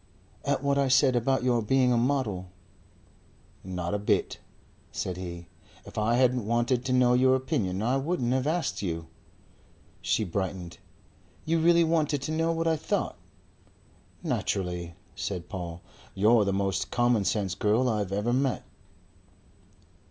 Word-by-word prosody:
"At - - 0
what 140 0 +2
I 140 - +2
said 130 0 +4
about 130 +2 +1
your 120 -2 +2
being 125 +3 +3
a - - +2
model." 115 -7 0 1.1
"Not 90 -1 -4
a 105 - 0
bit," 105 - 0 0.5
said 90 - -3
he. 85 -1 -7 0.4
"If - - -12
I 110 +2 +1
hadn't 125 -3 +2
wanted 120 +2 +1
to 130 - -1
know 125 -1 +4
your 130 +1 +4
opinion, 105 -7 -1
I 125 +4 +2
wouldn't 135 -4 0
have 130 +1 0
asked 160 -2 -1
you." 80 -4 -3 1.0
She 110 - +1
brightened. 95 -2 -4 0.7
"You 165 +1 +1
really 170 +1 +5
wanted 155 -4 +1
to 155 - -3
know 165 +1 +1
what 165 0 -1
I 160 -1 +2
thought?" - - -2 1.1
"Naturally," 90 -3 -2 0.2
said 90 -3 -4
Paul. 85 -3 -6 0.3
"You're 105 +2 +4
the 100 - +1
most 95 0 -1
commonsense 110 -5 +1
girl 110 +6 +2
I've 105 -5 -1
ever 105 +5 0
met." 130 0 0
120 Hz, 145 wpm, -28 LUFS, 95-130 Hz, 1.1 s, really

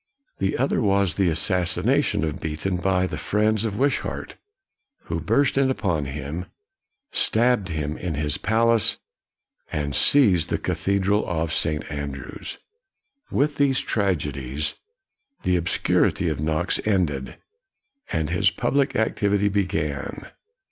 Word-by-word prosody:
The 95 0 0
other 135 +1 +1
was 100 -4 +2
the 95 0 +2
assassination 95 - +1
of 80 -2 -2
Beaton 80 +4 -2
by 95 0 +1
the - - -4
friends 110 +1 +1
of 105 -2 -3
Wishart, 140 +3 -1 0.7
who - - -4
burst 140 -1 +2
in 135 -1 +3
upon 90 - 0
him, 75 +5 -5 0.6
stabbed 115 -4 +2
him 75 -2 -3
in 90 -4 -3
his 75 0 -1
palace, 115 0 +2 0.7
and 70 -2 -2
seized 100 - +5
the - - 0
cathedral 100 +1 0
of 80 -1 -1
St. 75 -2 0
Andrews. 70 -2 -5 0.7
With 145 +1 0
these 135 -2 +3
tragedies, 75 - -1 0.7
the 90 - +2
obscurity 85 0 +1
of 75 -3 -3
Knox 80 +4 0
ended, 85 -11 -1 0.7
and 80 -1 -1
his 100 +3 +3
public 135 +6 0
activity 100 -2 +1
began. 85 -8 -2
95 Hz, 120 wpm, -24 LUFS, 75-105 Hz, 0.7 s, seized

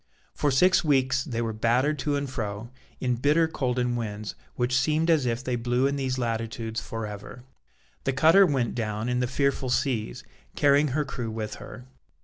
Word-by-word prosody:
For 145 - 0
six 180 +9 +4
weeks 130 -4 +2
they 120 -6 -3
were 115 -1 -2
battered 125 +7 +1
to 145 -2 0
and 140 0 -2
fro, 115 -2 -5 0.3
in 125 -2 0
bitter 150 +6 +3
cold 130 -5 -2
and 125 -1 0
winds 105 -2 -4 0.2
which 125 +1 0
seemed 155 +5 +2
as 150 -6 +2
if 120 +1 -1
they 125 -1 -1
blew 120 +2 0
in 140 +1 +1
these 130 -2 -2
latitudes 115 -1 -3
for 115 -1 -5
ever. 105 +4 -9 0.6
The 135 - +1
cutter 165 +8 +6
went 130 -6 0
down 110 0 -2
in 125 0 0
the 125 - +1
fearful 135 0 0
seas, 120 - -1 0.3
carrying 145 +1 +4
her 150 - +1
crew 125 -4 -4
with 110 -1 -5
her. 125 - -10
125 Hz, 185 wpm, -26 LUFS, 115-140 Hz, 0.6 s, cutter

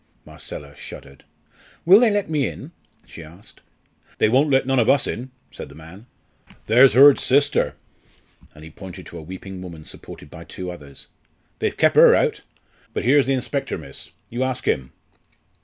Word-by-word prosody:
Marcella 70 0 -10
shuddered. 70 0 -12 0.6
"Will 190 +5 +8
they 240 -1 +4
let 205 -1 -1
me 150 -4 0
in?" 145 - -9 0.3
she 85 - -12
asked. 85 +6 -17 0.6
"They - - +2
won't 135 +6 +3
let 135 -1 +2
none 135 0 +1
ov 115 - +2
us 140 - +3
in," 125 +4 -5 0.2
said - - -10
the - - -14
man. 85 +8 -14 0.6
"There's 125 +4 +5
Hurd's 140 +2 +7
sister," 140 +2 +1 0.8
and 75 - -14
he 80 - -12
pointed 95 +3 -11
to 85 - -10
a - - -9
weeping 95 +3 -9
woman 85 -4 -10
supported 70 - -12
by 80 - -11
two 90 +1 -7
others. 70 -5 -12 0.5
"They've - - -2
kep' - - +3
her - - +7
out. - - 0 0.5
But - - -3
here's 135 +2 +4
the 135 - +1
inspector, 135 +2 -3
miss; 70 -5 -11 0.2
you 120 +2 -4
ask 130 -1 -3
him." 65 -1 -1
115 Hz, 175 wpm, -21 LUFS, 80-135 Hz, 0.8 s, Will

